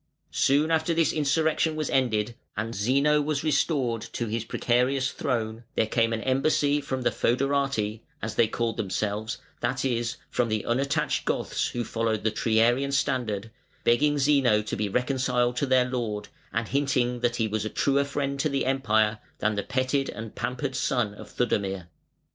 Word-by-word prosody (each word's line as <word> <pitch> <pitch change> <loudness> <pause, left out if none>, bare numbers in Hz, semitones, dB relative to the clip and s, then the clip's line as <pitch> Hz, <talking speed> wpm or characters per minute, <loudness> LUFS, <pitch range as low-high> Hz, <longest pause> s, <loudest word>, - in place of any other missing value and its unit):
Soon 145 +4 +3
after 160 +1 +2
this 165 -2 +2
insurrection 155 +1 +1
was 155 -2 -2
ended 120 -4 +1 0.2
and 110 +1 -2
Zeno 140 +8 +3
was 145 -1 -1
restored 140 -6 +1
to 120 - -2
his 110 0 -2
precarious 130 +4 +1
throne, 115 -5 -2
there - - +3
came 115 +1 +1
an 115 -1 -1
embassy 145 +2 +2
from 130 -2 -3
the - - +2
fœderati 130 -4 0 0.2
(as 110 +1 -4
they 110 - +3
called 115 +1 -2
themselves) 105 +2 -2 0.2
that - - -1
is, 120 -2 -1
from 120 -2 +1
the 110 -1 -1
unattached 135 +4 0
Goths - - -1
who 120 - -3
followed 115 -1 -1
the 110 - +2
Triarian 115 +5 +2
standard, 115 -6 -1 0.3
begging 145 +5 +3
Zeno 135 -7 +3
to - - -3
be 105 0 -1
reconciled 125 0 +1
to 140 - 0
their 130 -1 +4
lord, 115 -5 -3 0.2
and 110 0 -1
hinting 130 -3 +1
that 120 0 +1
he 115 -2 0
was 110 0 -2
a 110 - -2
truer 140 +4 +2
friend 140 -1 -2
to 155 - +1
the 140 -1 0
Empire 110 -5 +2 0.2
than 110 - +1
the 100 - -1
petted 130 +4 0
and 110 0 -7
pampered 125 +1 -3
son 120 -5 0
of - - -11
Theudemir. 95 -6 -1
125 Hz, 170 wpm, -26 LUFS, 110-140 Hz, 0.3 s, their